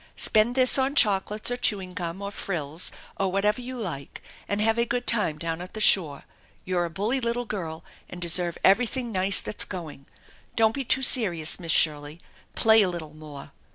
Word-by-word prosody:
Spend 220 +3 +3
this 255 +1 +5
on 270 +2 0
chocolates 210 0 +2
or 245 - -2
chewing 195 -6 -1
gum 180 +1 -6
or 200 - -5
frills 165 -5 -4 0.3
or 195 -1 -1
whatever 210 +4 0
you 255 +1 -7
like 165 - -7 0.2
and 205 - -2
have 225 +2 +2
a - - +3
good 245 +1 -2
time 205 -9 +1
down 165 +1 -4
at 180 +3 -10
the - - -5
shore. 160 -9 +4 0.4
You're 180 -1 -1
a - - -5
bully 215 +10 -2
little 235 +1 -2
girl 170 -7 -6 0.3
and 180 - -9
deserve 175 0 +1
everything 240 +4 +2
nice 190 0 +1
that's 210 - -4
going. 155 -7 -9 0.5
Don't 220 -1 +3
be 275 - -4
too 265 +1 +2
serious, 175 -13 +1
Miss 165 -2 -3
Shirley. 150 0 +1 0.4
Play 220 0 +5
a 195 - +2
little 160 -4 -7
more. 150 -2 -11
195 Hz, 190 wpm, -25 LUFS, 165-225 Hz, 0.5 s, this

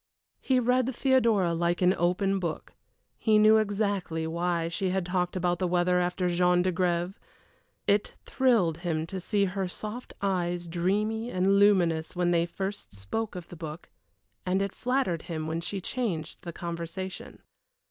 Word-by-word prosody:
He 260 -1 +2
read 250 +1 +2
Theodora 230 -10 +3
like 170 +1 0
an 180 +1 +5
open 190 +3 +1
book: 170 -4 -4 0.5
he 215 -2 +4
knew 215 +1 +7
exactly 200 -6 -1
why 170 0 -1
she 185 +3 -1
had 185 -1 -1
talked 180 0 -1
about 175 -1 0
the 185 - +1
weather 180 0 +2
after 180 +1 0
Jean 180 0 +3
d'Agrève. 180 0 0 0.7
It 205 +1 +1
thrilled 220 - +2
him 165 -3 -1
to 190 +3 -5
see 200 +2 +1
her 190 0 -2
soft 215 +6 -7
eyes 175 -3 -1
dreamy 210 +7 0
and 195 -1 +2
luminous 175 -6 +3
when 175 0 +1
they 170 0 +2
first 195 - -5
spoke 195 - -4
of 180 -2 -8
the - - -9
book, 160 0 -8 0.5
and 185 +1 +1
it 195 - -3
flattered 250 -10 0
him 155 -2 -5
when 160 +1 -2
she 195 +3 -4
changed 180 -8 -3
the 170 - -6
conversation. 170 +2 -6
180 Hz, 155 wpm, -28 LUFS, 170-200 Hz, 0.7 s, knew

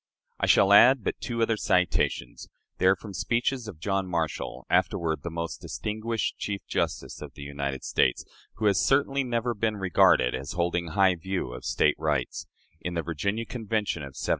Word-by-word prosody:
I - - +1
shall 100 +1 +5
add 125 +3 +7
but - - -3
two 115 -1 -1
other 115 -1 +1
citations. 90 -11 0 0.3
They 95 - +3
are 95 - +6
from 100 +1 -10
speeches 120 +6 -1
of 100 -7 -8
John 95 +1 -1
Marshall, 80 -6 -3
afterward 85 -3 +1
the 85 - -5
most 85 0 -5
distinguished 110 +1 -3
Chief 100 -1 -4
Justice - - -3
of - - -9
the 70 - -9
United 70 -1 -4
States 60 - +1 0.3
who 110 - -3
has 100 -2 +3
certainly 140 0 +2
never 120 -1 -1
been 110 0 -1
regarded 90 -9 +4
as 70 - -5
holding 85 0 -1
high 95 +3 +3
views 95 +2 -4
of - - -9
State - - +2
rights 75 -5 -2 0.3
in 90 0 -4
the 85 - -1
Virginia 100 +9 -2
Convention 110 -8 -2
of 70 -2 -9
1788. - - -4
95 Hz, 180 wpm, -27 LUFS, 80-110 Hz, 0.3 s, add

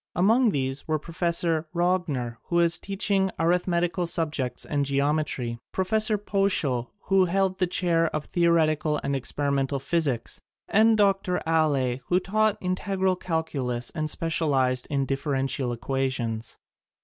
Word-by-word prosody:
Among 225 +7 +4
these 135 -5 -2
were 155 -1 +1
Prof. 165 +3 -12 0.5
Rogner, 170 -10 0
who 170 - -4
was 170 -1 +3
teaching 195 -1 0
arithmetical 175 +1 +1
subjects 155 -7 -1
and 145 -1 -1
geometry; 140 -4 -1
Prof. 190 0 -2 0.3
Poeschl, 155 - +1
who 195 -1 +3
held 190 +1 0
the 180 - +2
chair 170 -2 +2
of 155 -1 -4
theoretical 155 -3 +2
and 140 0 -1
experimental 140 +1 -1
phys 155 +1 0
ics, 115 -2 -5 0.3
and 220 +1 +4
Dr. 195 -3 +2
Alle, 145 -6 +1
who 180 - +3
taught 215 +2 +1
integral 190 0 0
cal 165 -3 -1
culus 125 -6 -3
and 155 -2 -2
specialized 140 -7 +1
in 140 -2 0
differential 135 -1 -1
equa 135 +2 -1
tions. 115 -3 -4
160 Hz, 135 wpm, -26 LUFS, 135-180 Hz, 0.5 s, Among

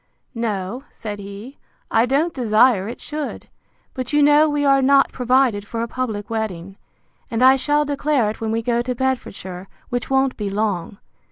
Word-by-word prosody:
No, 225 0 -3
said 210 -2 -7
he, 200 +7 -10 0.3
I 225 +2 +3
don't 300 +6 +1
desire 220 -4 +3
it 235 - -7
should; 300 -1 -6 0.5
but 255 -1 -4
you 295 0 +4
know 295 +2 +5
we 290 -1 0
are 275 -1 +4
not 275 +1 +4
provided 250 -4 +2
for 230 +1 -3
a - - -3
public 220 -4 -4
wedding, 195 -5 -4 0.5
and 235 0 0
I 260 +1 +8
shall 295 +2 +1
declare 285 -4 +1
it 220 - -11
when 225 - -2
we 225 +1 -1
go 235 0 +1
to 250 +1 -3
Bedfordshire, 195 -8 -3 0.2
which 245 0 -3
won't 265 0 +2
be 205 -2 -3
long. 200 -2 -2
245 Hz, 175 wpm, -21 LUFS, 215-270 Hz, 0.5 s, I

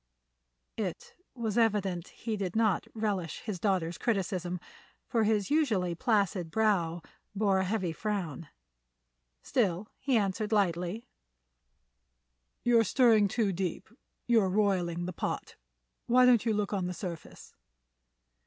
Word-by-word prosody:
It 195 -6 -4 0.2
was 230 -2 -1
evident 195 -6 +1
he 225 -2 -5
did 195 -2 -3
not 220 -3 +2
relish 200 -7 -2
his 205 -5 -5
daughter's 180 -4 0
criticism, 185 -5 -1 0.5
for 230 -4 +1
his 210 +1 +1
usually 220 - +2
placid 200 -4 0
brow 175 -5 +1 0.3
bore 200 -2 +2
a 190 - 0
heavy 185 -4 -1
frown. 175 -6 -4 0.9
Still, 200 -4 0
he 260 -3 +2
answered 210 +1 -1
lightly: 190 +1 0 1.6
"You're 235 -1 +5
stirring 225 -2 +4
too 205 -1 0
deep; 180 +2 -4 0.3
you're 225 -5 +3
roiling 180 -4 +1
the 180 - -4
pot. - - -4 0.5
Why 250 +1 +6
don't 240 -2 +4
you 225 - +3
look 210 0 -1
on 190 -3 -1
the 180 - -4
surface?" 170 -4 -8
200 Hz, 125 wpm, -30 LUFS, 180-220 Hz, 1.6 s, Why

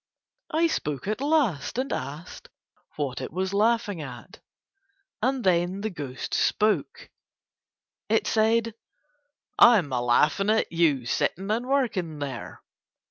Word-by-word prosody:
I 320 +2 +2
spoke 150 - -2
at 215 +4 -2
last 280 - +1
and 260 +2 -1
asked 150 +6 -7 0.5
what 135 -4 -3
it 130 - -5
was 185 +3 -2
laughing 210 -3 +1
at, 130 +4 -10 0.8
and 260 +2 0
then 180 +1 +1
the 220 +1 -3
ghost 140 -7 -6
spoke. 220 - 0 1.0
It 225 - +2
said: 225 +1 +2 0.9
"I'm 200 - +6
a 125 - 0
laughin' 150 +11 +2
at 220 +1 +1
you 155 -7 +2
sittin' 195 - -1
and 235 +3 -1
workin' 215 - 0
there." 135 -6 -6
195 Hz, 125 wpm, -26 LUFS, 145-230 Hz, 1.0 s, I'm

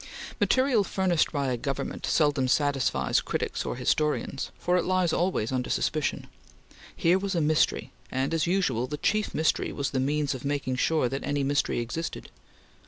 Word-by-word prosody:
Material 260 -5 +3
furnished 185 -4 +1
by 140 -3 -1
a 125 - -1
government 135 +2 -4
seldom 145 -4 +2
satisfies 135 - +1
critics - - -2
or - - -2
historians, 140 +2 0
for 180 - 0
it 180 - +2
lies 185 -2 +1
always 170 - 0
under 130 -1 -2
suspicion. 155 -2 -1 0.7
Here 175 +3 +3
was 195 -1 -2
a - - +2
mystery, 155 0 +1 0.2
and 135 +4 -1
as 165 0 +1
usual, 140 -10 +1
the 150 - -4
chief 215 +7 0
mystery 160 - +1
was 140 - -2
the 135 - 0
means 145 +1 0
of 130 - -7
making 140 -2 -1
sure 155 0 +2
that 135 +3 -4
any 145 -1 -1
mystery 140 +1 +1
existed. 160 +8 -5
145 Hz, 170 wpm, -27 LUFS, 135-170 Hz, 0.7 s, Material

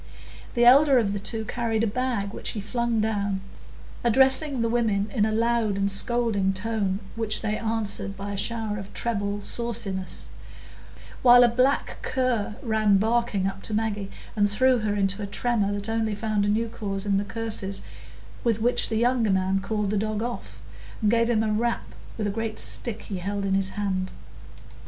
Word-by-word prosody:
The 240 0 +4
elder 275 +2 +7
of 210 -5 +1
the 205 - -2
two 220 +2 -1
carried 225 -1 -1
a - - +4
bag, 230 -3 -2
which - - -3
he 220 - -4
flung 235 +2 -1
down, 205 -3 -1 0.6
addressing 265 +2 +4
the - - +2
women 220 -3 0
in 215 -1 +2
a - - -1
loud 225 -2 +1
and 200 0 +1
scolding 205 -2 +1
tone, 200 -1 -1 0.2
which 225 -1 -1
they 215 -1 0
answered 215 -3 -2
by 200 +1 -5
a - - -3
shower 215 0 -2
of 195 0 -10
treble 205 -3 -1
sauciness; 205 -6 -5 0.9
while 245 -1 +8
a - - +7
black 255 +4 +1
cur 250 -5 -1
ran 215 -4 +3
barking 220 -2 +1
up 195 - -3
to 215 - -2
Maggie, 210 -2 -2 0.3
and 205 -1 +3
threw 255 +4 +3
her 210 -1 -1
into 200 +1 0
a 200 - -3
tremor 210 -1 0
that 205 +1 0
only 225 -1 0
found 210 -1 0
a - - +1
new 225 +2 +1
cause 200 -3 -4
in 200 -1 +2
the 200 - 0
curses 205 -2 -3 0.6
with 230 -2 +1
which 240 +3 +1
the 220 - 0
younger 240 -1 +2
man 190 0 +1
called 210 0 -2
the 210 - 0
dog 215 +1 -1
off, 110 - -6 0.4
and 210 - +4
gave 230 0 +2
him 220 -2 +2
a 215 -1 0
rap 235 +2 -1 0.2
with 215 - -2
a 205 - 0
great 225 +1 -3
stick 230 -3 -1
he 200 - -5
held 200 +2 -3
in 195 - 0
his 195 0 +1
hand. 190 -2 -1
215 Hz, 185 wpm, -25 LUFS, 200-235 Hz, 0.9 s, while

